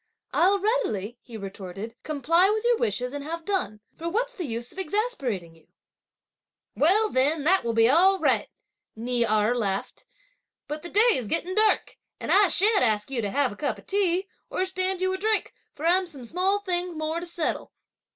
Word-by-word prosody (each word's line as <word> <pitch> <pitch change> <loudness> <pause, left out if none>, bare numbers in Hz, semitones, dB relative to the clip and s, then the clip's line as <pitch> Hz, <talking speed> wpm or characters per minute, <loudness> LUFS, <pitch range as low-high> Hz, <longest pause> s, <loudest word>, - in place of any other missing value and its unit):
"I'll 385 +4 +4
readily," 370 - -1
he 230 -2 -10
retorted, 195 +2 -7
"comply 325 +5 +2
with 430 +1 0
your 480 -1 +3
wishes 250 +5 -1
and 285 -1 -5
have 330 +2 -6
done; 285 - -2
for 335 +1 -4
what's - - -1
the 360 -10 -5
use 235 0 -4
of - - -9
exasperating 290 - -2
you!" 160 - -24 1.1
"Well 410 +8 +4
then 285 +4 +2
that 375 +5 +3
will 230 -1 -1
be 225 0 +5
all 365 +8 +5
right!" - - +1 0.5
Ni 240 +2 -1
Erh 215 0 +2
laughed; 200 -5 -3 0.6
"but 300 +1 -5
the 345 - -8
day 430 +6 +4
is 250 - -1
getting 345 - -1
dark; 430 +1 +1 0.2
and - - -3
I 405 0 +6
shan't 410 +5 +3
ask 215 0 +1
you 250 -3 0
to 205 - -2
have 280 +4 +1
a - - -9
cup 290 - -2
of - - -16
tea 385 -1 0 0.2
or 370 - -1
stand 375 0 +1
you 375 0 +1
a - - -2
drink, 435 +1 0 0.2
for 300 - -6
I've 360 +1 +3
some 275 -7 -9
small 375 - +1
things 360 -3 -2
more 315 +1 -2
to 350 - -7
settle. 335 -2 -3
330 Hz, 190 wpm, -26 LUFS, 235-385 Hz, 1.1 s, I